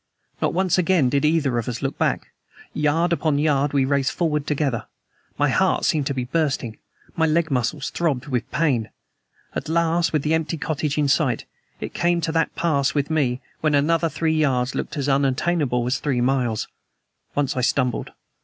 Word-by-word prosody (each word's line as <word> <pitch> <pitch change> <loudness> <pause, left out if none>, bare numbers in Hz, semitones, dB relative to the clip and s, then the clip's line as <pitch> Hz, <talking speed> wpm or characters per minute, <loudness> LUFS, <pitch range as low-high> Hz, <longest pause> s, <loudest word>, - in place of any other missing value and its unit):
Not - - +2
once 185 0 +1
again 175 -7 +3
did 140 +2 +1
either 150 -6 +2
of 115 - -3
us 115 - -5
look - - -1
back. - - 0 0.4
Yard 160 +3 +1
upon 155 -3 +1
yard 145 -1 +2
we 140 -2 +2
raced 135 -1 +1
forward 150 -4 -1
together. 140 -6 -1 0.5
My - - +2
heart - - +2
seemed 150 -3 +1
to 140 - -1
be 130 - -1
bursting. 135 -5 -1 0.4
My 160 -1 +2
leg 160 0 +1
muscles 130 +3 -1
throbbed 150 -7 -1
with 125 -5 -2
pain. 135 -9 0 0.6
At - - -4
last, 170 +1 +2
with 155 -3 0
the 155 - +1
empty 160 0 0
cottage 150 -1 -2
in 150 -1 +2
sight, 135 -4 +1 0.3
it - - -6
came 175 0 +1
to 160 - -1
that 165 0 0
pass 140 -5 +1
with 145 +1 0
me 130 -5 +1 0.2
when 155 -2 +2
another 165 +3 +2
three 160 0 0
yards 135 -5 +1
looks - - -4
as 140 -1 -1
unattainable 135 -1 +1
as 125 +1 0
three 135 -4 0
miles. 120 -3 0 0.7
Once 145 0 0
I 130 - 0
stumbled. 125 0 0
145 Hz, 180 wpm, -23 LUFS, 130-160 Hz, 0.7 s, again